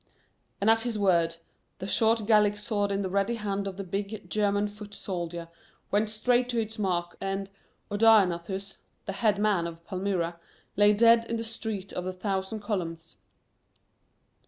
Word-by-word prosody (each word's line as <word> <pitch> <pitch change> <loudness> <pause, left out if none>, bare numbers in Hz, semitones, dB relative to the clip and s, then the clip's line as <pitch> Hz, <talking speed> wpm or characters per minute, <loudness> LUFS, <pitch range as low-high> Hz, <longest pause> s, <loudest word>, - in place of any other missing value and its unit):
and 200 - 0
at 225 0 +5
his 235 -2 -2
word 170 -5 +3 0.4
the 190 - -6
short 220 +2 +2
Gallic 210 -1 +4
sword 205 -1 -1
in 200 0 0
the 190 - -2
ready 200 +4 +1
hand 200 -2 -2
of 190 -1 -6
the 200 - -4
big 200 +3 -4
German 205 -1 +1
foot 205 0 -10
soldier 170 -3 -4 0.4
went 210 +1 +2
straight 245 +3 +1
to 240 -2 0
its 220 0 -4
mark 175 -3 -1
and 195 0 -3 0.4
Odaenathus, 195 -3 +3 0.3
the 195 - -3
"head 205 0 +2
man" 205 -5 +2
of 170 0 -10
Palmyra, 180 -3 -2 0.4
lay 205 +1 +6
dead 230 +2 +5
in 230 0 -2
the 225 - -3
Street 220 -4 -5
of 180 - -3
the 185 +1 -3
Thousand 190 +2 -3
Columns. 165 -6 -4
200 Hz, 160 wpm, -28 LUFS, 185-215 Hz, 0.4 s, lay